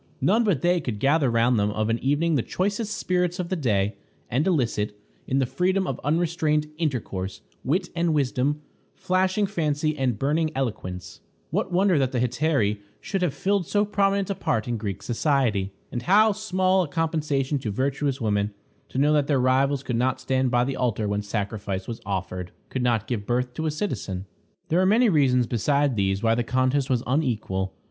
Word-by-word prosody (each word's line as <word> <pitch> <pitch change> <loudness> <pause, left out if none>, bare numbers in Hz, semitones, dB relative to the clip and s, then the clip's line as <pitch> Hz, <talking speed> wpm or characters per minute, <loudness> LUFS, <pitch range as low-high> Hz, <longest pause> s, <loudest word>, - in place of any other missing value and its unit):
None 225 +5 +3
but 195 - +1
they 175 0 +3
could 120 -7 -3
gather 140 +4 +3
round 115 0 +3
them 100 0 +2
of 110 +1 -1
an 115 +1 0
evening 145 +5 +1
the 140 - +2
choicest 205 - -2
spirits 180 -1 0
of 180 -3 -3
the 185 - 0
day, 105 - +1 0.4
and 140 +8 +1
elicit, 110 - 0 0.3
in 130 - 0
the 135 - +3
freedom 185 +9 0
of - - -3
unrestrained 155 -1 +1
intercourse, 105 - -3 0.2
wit 180 +7 0
and 170 -1 +1
wisdom, 145 0 0 0.3
flashing 190 +2 +1
fancy 155 -5 -1
and 130 -6 0
burning 155 +6 +1
eloquence. 90 -9 -4 0.3
What 190 - -1
wonder 180 -2 +3
that 130 -1 0
the 125 - +1
Hetairæ 125 -4 +1 0.2
should 195 - -3
have 165 -6 0
filled 195 -1 0
so 205 0 +2
prominent 200 -1 +1
a - - +1
part 110 - -1
in 120 -1 -1
Greek 100 -2 -5
society! 120 -5 +1 0.2
And 120 - -3
how 210 - +5
small 190 -2 +1
a 175 - -1
compensation 150 -3 0
to 115 - -4
virtuous 135 +4 -1
women 105 -3 0 0.3
to - - -6
know 145 +3 +4
that 145 -2 +2
their 140 -3 +2
rivals 135 +2 +2
could 120 -3 -2
not 130 +2 +1
stand 130 -1 0
by 120 0 +3
the 135 +2 -2
altar 115 -4 0
when 105 0 -1
sacrifice 100 -2 -3
was 115 - -6
offered; 90 -2 -3 0.2
could 130 - -2
not 115 -3 +1
give 110 -4 -3
birth 125 +1 0
to 160 +5 -2
a - - +2
citizen! 125 - -3 0.4
There 170 +3 +3
are - - +3
many 225 +4 +4
reasons 130 -7 +3
besides 140 +4 +1
these 95 -1 0
why 115 0 +4
the 120 +1 +1
contest 130 +3 +1
was 125 -2 +1
unequal. 110 -9 -1
135 Hz, 190 wpm, -25 LUFS, 115-170 Hz, 0.4 s, how